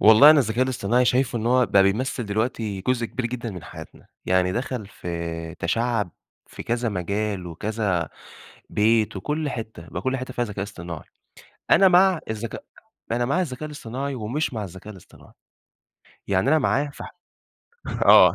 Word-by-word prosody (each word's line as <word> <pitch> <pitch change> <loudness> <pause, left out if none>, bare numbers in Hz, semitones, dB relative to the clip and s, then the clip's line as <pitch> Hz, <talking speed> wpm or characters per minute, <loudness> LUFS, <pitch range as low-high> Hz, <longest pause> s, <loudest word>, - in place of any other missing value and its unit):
والله 110 +8 +9
أنا 155 - +7
الذكاء 120 +2 +1
الاصطناعي 125 -1 +1
شايفه 125 -1 +2
إن 110 - -3
هو 125 0 +4
بقى 100 -1 +5
بيمثّل 120 +4 0
دلوقتي 110 -1 -2
جزء 120 -2 +1
كبير 125 +1 -3
جدًا 120 -1 -4
من 90 -5 -8
حياتنا، - - -11 0.2
يعني 90 0 +2
دخَل 120 -1 -3
في 85 -3 -5
تشعّب 115 +1 0 0.4
في - - -9
كذا 120 0 -1
مجال، 100 0 -2
وكذا 90 -1 -1 0.6
بيت 110 0 +2
وكل 150 +9 -2
حتّه، 110 -9 -7
بقى 90 - -5
كل 130 0 0
حتّه 130 0 -6
فيها 120 - 0
ذكاء 105 -3 -5
اصطناعي. 85 -5 -8 0.7
أنا 195 - +7
مع 185 -1 +5
الذكاء 110 +1 -5 0.5
أنا 120 +1 +1
مع 160 +9 +1
الذكاء 150 -4 -4
الاصطناعي 140 -1 -5
ومش 125 +6 -2
مع 110 -2 -3
الذكاء 95 +3 -9
الاصطناعي، 95 - -17 0.9
يعني 100 +6 +2
أنا 155 +1 +5
معاه 145 0 +1
ف - - -11 1.0
آه - - +8
115 Hz, 155 wpm, -24 LUFS, 100-130 Hz, 1.0 s, والله